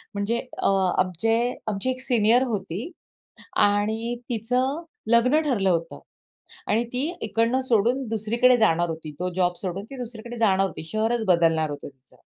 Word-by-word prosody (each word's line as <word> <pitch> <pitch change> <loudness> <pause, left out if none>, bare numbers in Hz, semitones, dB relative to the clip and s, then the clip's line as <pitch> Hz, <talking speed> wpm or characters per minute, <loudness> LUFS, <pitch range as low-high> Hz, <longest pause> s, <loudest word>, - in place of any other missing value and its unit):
म्हणजे 210 +4 0 0.2
अ, - - 0 0.3
आमचे 185 +5 +1 0.3
आमची 215 +4 -1
एक 255 - -5
सीनियर 240 -1 +3
होती 210 - -4 0.7
आणि 220 +3 +1 0.2
तिचं 250 +7 0 0.3
लग्न 250 +6 +4
ठरलं 225 -11 +1
होतं 165 -1 -1 0.7
आणि 225 +3 +1
ती 255 +3 0 0.2
इकडनं 230 +3 +1
सोडून 245 +2 +1
दुसरीकडे 225 +3 +3
जाणार 175 -7 +2
होती. 160 -2 -6
तो 180 - 0
जॉब 180 -1 +1
सोडून 190 +1 -4
ती 275 - -8
दुसरीकडे 240 0 -7
जाणार 195 -4 +3
होती. 160 -3 -7
शहरच 220 +6 -1
बदलणार 165 -3 +3
होतं 145 -1 -7
तिचं. 135 -2 -23
220 Hz, 145 wpm, -24 LUFS, 185-240 Hz, 0.7 s, लग्न